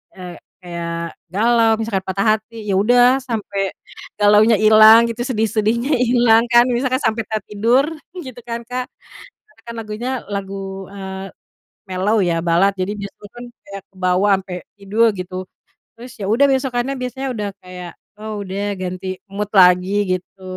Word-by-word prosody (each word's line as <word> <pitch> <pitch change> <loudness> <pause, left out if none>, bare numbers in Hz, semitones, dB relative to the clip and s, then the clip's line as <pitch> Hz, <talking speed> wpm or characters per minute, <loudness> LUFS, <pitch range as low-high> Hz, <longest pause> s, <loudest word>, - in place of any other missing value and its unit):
eee, 180 -2 -9 0.3
kayak 170 -1 -5 0.2
galau 225 +2 +3
misalkan 215 -4 -2
patah 195 +1 -1
hati 220 0 -12
ya 195 - +1
udah, 245 +4 +4
sampai 205 -5 -3 0.5
galaunya 210 +2 +5
hilang 220 +2 +7
gitu 235 +1 -4
sedih-sedihnya 225 +3 0
hilang 240 -2 +4
kan. 240 0 +7
Misalkan 255 +1 0
sampai 225 +1 0
tertidur 220 +5 +1 0.3
gitu 260 -9 -8
kan 235 0 -4
Kak. 250 +1 -4 0.6
Karena 285 -6 -27
kan 235 - -6
lagunya 220 +3 -5 0.2
lagu, 195 -1 -5
eee, 190 -1 -7 0.6
mellow 190 +4 0
ya 170 -2 0
balad, 175 +4 +3
jadi 185 +2 -1
dia 200 -1 -6
itukan 210 +4 -13 0.2
kayak 200 -1 -8
kebawa 185 +1 +1
sampai 185 -2 -7 0.2
tidur 210 +4 +2
gitu. 185 0 -5 0.5
Terus 245 +2 -11
ya 195 - -4
udah 225 +7 +3
besokannya 265 -1 -1
biasanya 260 +2 -4
udah 210 -4 -3
kayak, 180 -1 -9 0.3
"Oh 215 -1 -5
udah 200 +1 -3
ganti 185 0 -5 0.2
mood 205 +1 -3
lagi," 185 +2 +5 0.2
gitu. 190 +1 -23
210 Hz, 145 wpm, -19 LUFS, 190-235 Hz, 0.6 s, hilang